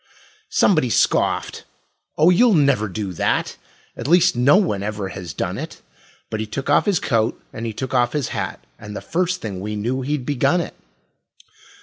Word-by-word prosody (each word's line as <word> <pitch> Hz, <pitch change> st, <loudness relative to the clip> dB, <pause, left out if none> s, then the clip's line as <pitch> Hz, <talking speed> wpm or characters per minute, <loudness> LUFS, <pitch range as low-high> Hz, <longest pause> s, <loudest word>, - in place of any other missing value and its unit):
Somebody 155 Hz, -10 st, +3 dB
scoffed: -, -, +1 dB, 0.5 s
"Oh, 160 Hz, +4 st, +6 dB
you'll 220 Hz, +3 st, +5 dB
never 140 Hz, -8 st, +3 dB
do 100 Hz, -1 st, -4 dB
that; -, -, 0 dB, 0.4 s
At -, -, -5 dB
least 175 Hz, 0 st, +4 dB
no 130 Hz, +6 st, +5 dB
one 170 Hz, -, +1 dB
ever 105 Hz, -1 st, -3 dB
has 90 Hz, -4 st, -7 dB
done -, -, -3 dB
it"; -, -, -7 dB, 0.5 s
But 110 Hz, -, -2 dB
he 110 Hz, -, -3 dB
took 135 Hz, +6 st, -3 dB
off 145 Hz, -, +4 dB
his 195 Hz, -6 st, +3 dB
coat 115 Hz, -2 st, 0 dB
and 115 Hz, 0 st, -5 dB
he 110 Hz, -, -4 dB
took 130 Hz, +4 st, -5 dB
off 120 Hz, -1 st, +2 dB
his 145 Hz, -5 st, -1 dB
hat, 60 Hz, -, -4 dB
And 105 Hz, 0 st, -9 dB
the -, -, -5 dB
first 180 Hz, +2 st, -1 dB
thing 100 Hz, -4 st, -5 dB
we 105 Hz, +2 st, -4 dB
knew 120 Hz, +6 st, -2 dB
he'd 140 Hz, 0 st, -2 dB
begun 145 Hz, +6 st, +2 dB
it. 170 Hz, -, -4 dB
125 Hz, 185 wpm, -21 LUFS, 105-155 Hz, 0.5 s, Oh